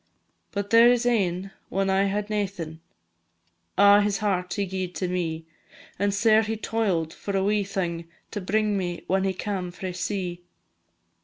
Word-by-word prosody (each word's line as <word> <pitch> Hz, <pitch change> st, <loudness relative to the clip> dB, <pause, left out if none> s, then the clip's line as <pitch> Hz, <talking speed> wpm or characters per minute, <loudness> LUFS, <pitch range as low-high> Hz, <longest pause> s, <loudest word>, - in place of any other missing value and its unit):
But 200 Hz, -1 st, -3 dB
there 230 Hz, +1 st, +8 dB
is 245 Hz, -1 st, +1 dB
ane, 195 Hz, -5 st, +1 dB, 0.2 s
when 195 Hz, 0 st, 0 dB
I 195 Hz, +1 st, +3 dB
had 205 Hz, +1 st, -1 dB
naething, 185 Hz, -6 st, -3 dB, 1.0 s
A' 200 Hz, +1 st, +7 dB
his 205 Hz, -1 st, +1 dB
heart 185 Hz, -4 st, -1 dB
he 200 Hz, -, 0 dB
gi'ed 185 Hz, -1 st, -4 dB
to 185 Hz, -, -1 dB
me; 165 Hz, -3 st, -2 dB, 0.5 s
And 205 Hz, 0 st, +2 dB
sair 220 Hz, +2 st, +4 dB
he 220 Hz, 0 st, -2 dB
toil'd 195 Hz, -8 st, -1 dB
for 200 Hz, -1 st, -3 dB
a 190 Hz, -, +1 dB
wee 205 Hz, +1 st, +2 dB
thing, 175 Hz, -4 st, -3 dB, 0.2 s
To 205 Hz, -, -4 dB
bring 210 Hz, +1 st, +1 dB
me 175 Hz, -2 st, -4 dB
when 190 Hz, +1 st, +1 dB
he 190 Hz, -, +1 dB
cam 190 Hz, -2 st, -3 dB
frae 180 Hz, +1 st, -6 dB
sea. 180 Hz, -1 st, -3 dB
195 Hz, 165 wpm, -26 LUFS, 180-205 Hz, 1.0 s, there